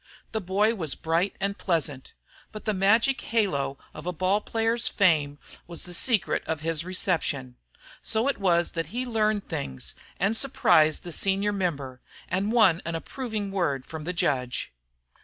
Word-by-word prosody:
The 220 Hz, -, -2 dB
boy 200 Hz, +4 st, +2 dB
was 160 Hz, -10 st, -2 dB
bright 165 Hz, +4 st, 0 dB
and 200 Hz, +1 st, -1 dB
pleasant; 155 Hz, -7 st, -1 dB, 0.4 s
but 215 Hz, -, -9 dB
the 215 Hz, -, +1 dB
magic 220 Hz, +7 st, +3 dB
halo 165 Hz, -12 st, 0 dB, 0.2 s
of 155 Hz, +3 st, -8 dB
a -, -, +1 dB
ball 185 Hz, +4 st, +1 dB
player's 225 Hz, +2 st, 0 dB
fame 155 Hz, -7 st, +3 dB, 0.3 s
was 170 Hz, -1 st, -4 dB
the 180 Hz, -, -5 dB
secret 215 Hz, +4 st, +1 dB
of 160 Hz, -2 st, -2 dB
his 165 Hz, 0 st, -1 dB
reception. 165 Hz, -8 st, -1 dB, 0.5 s
So 225 Hz, +3 st, 0 dB
it 280 Hz, -, 0 dB
was 175 Hz, -3 st, +3 dB
that 165 Hz, -1 st, -3 dB
he 250 Hz, +3 st, -3 dB
learned 215 Hz, -3 st, +1 dB
things, 65 Hz, -2 st, -4 dB, 0.3 s
and 195 Hz, +4 st, +2 dB
surprised 175 Hz, -, +3 dB
the 175 Hz, -, -7 dB
senior 195 Hz, +4 st, 0 dB
member, 145 Hz, -10 st, -2 dB, 0.3 s
and 195 Hz, +3 st, 0 dB
won 210 Hz, -8 st, +5 dB
an 170 Hz, 0 st, -3 dB
approving 215 Hz, +2 st, -4 dB
word 145 Hz, -9 st, 0 dB
from 155 Hz, -1 st, -7 dB
the 180 Hz, -, -1 dB
judge. 125 Hz, -, -1 dB
185 Hz, 160 wpm, -27 LUFS, 160-215 Hz, 0.5 s, won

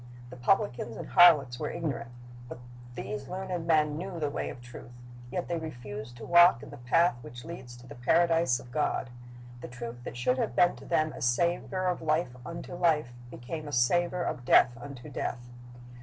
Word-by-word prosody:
The -, -, -8 dB
pub 125 Hz, +10 st, +4 dB
licans 120 Hz, -, -6 dB
and -, -, -7 dB
harlots 150 Hz, -9 st, +6 dB
were 150 Hz, -, -2 dB
ignorant, 145 Hz, -8 st, -4 dB, 0.4 s
but -, -, -7 dB, 0.4 s
these 105 Hz, -2 st, -5 dB
learned 185 Hz, -2 st, -4 dB
men 150 Hz, -2 st, +2 dB
knew 180 Hz, -1 st, -5 dB
the 150 Hz, -2 st, -1 dB
way -, -, -3 dB
of -, -, -9 dB
truth. 120 Hz, -1 st, -11 dB, 0.4 s
Yet 175 Hz, +8 st, -3 dB
they 170 Hz, -1 st, -2 dB
refused 120 Hz, -6 st, -8 dB
to 115 Hz, -, -9 dB
walk 175 Hz, -8 st, +6 dB
in -, -, -10 dB
the -, -, -9 dB
path 125 Hz, +5 st, +2 dB
which 120 Hz, +1 st, -10 dB
leads 125 Hz, -8 st, -9 dB
to 120 Hz, -, -14 dB
the -, -, -10 dB
Paradise 165 Hz, +1 st, +2 dB
of 120 Hz, -, -13 dB
God. 135 Hz, -3 st, -1 dB, 0.5 s
The -, -, -7 dB
truth 120 Hz, 0 st, -8 dB
that 120 Hz, -, -7 dB
should 125 Hz, +1 st, +1 dB
have 120 Hz, -, -1 dB
been 175 Hz, 0 st, +4 dB
to -, -, -13 dB
them 155 Hz, -3 st, +1 dB
a -, -, -9 dB
savor 170 Hz, +8 st, 0 dB
of 180 Hz, -1 st, 0 dB
life 155 Hz, -4 st, 0 dB
unto 170 Hz, +6 st, -7 dB
life 160 Hz, -7 st, +1 dB, 0.2 s
became 145 Hz, +6 st, -7 dB
a -, -, -6 dB
savor 175 Hz, +8 st, +2 dB
of 125 Hz, -, -3 dB
death 120 Hz, 0 st, +5 dB
unto 125 Hz, +1 st, -10 dB
death. 120 Hz, 0 st, -4 dB
145 Hz, 195 wpm, -29 LUFS, 120-170 Hz, 0.5 s, harlots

